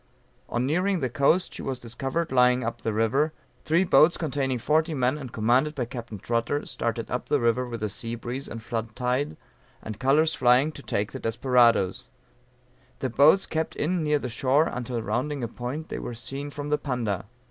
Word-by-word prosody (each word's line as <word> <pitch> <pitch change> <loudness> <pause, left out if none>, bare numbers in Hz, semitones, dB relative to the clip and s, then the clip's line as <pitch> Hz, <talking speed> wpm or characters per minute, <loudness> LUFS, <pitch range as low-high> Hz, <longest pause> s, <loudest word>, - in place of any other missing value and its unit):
On 120 +1 0
nearing 180 +6 +1
the 130 -5 -2
coast, 150 +8 +2
she - - -7
was 130 -2 -3
discovered 135 +7 -3
lying 125 0 +4
up 115 +1 -4
the 110 - -1
river; 115 +8 +1 0.3
three 165 +4 +3
boats 175 -2 +5
containing 135 -5 -1
forty 155 +6 +1
men 130 0 +1
and 135 -5 -7
commanded 125 +8 +2
by 125 - -1
Capt. 115 -5 -8
Trotter, 120 +5 -1
started 115 0 -3
up 125 - -2
the 145 -1 +2
river 120 +1 +1
with 115 -2 -6
the 105 - 0
sea 115 +4 -3
breeze 125 +4 -5
and 115 -1 -7
flood 115 -1 -4
tide, 125 - -1 0.4
and 110 -1 -8
colors 150 +5 +3
flying 125 +4 +4
to 145 - -11
take 105 -5 -2
the - - -6
desperadoes; 115 -4 +2 0.9
the 130 - -3
boats 155 +10 +5
kept 160 0 -2
in 175 +3 0
near 150 -1 +2
the 135 - -4
shore 130 +5 +2
until 120 -4 -3
rounding 135 +4 -2
a - - -1
point 125 +7 -6
they - - -4
were 120 - -6
seen 135 +5 -5
from 145 0 -6
the 150 - +1
Panda. 120 - -2
130 Hz, 190 wpm, -26 LUFS, 115-150 Hz, 0.9 s, boats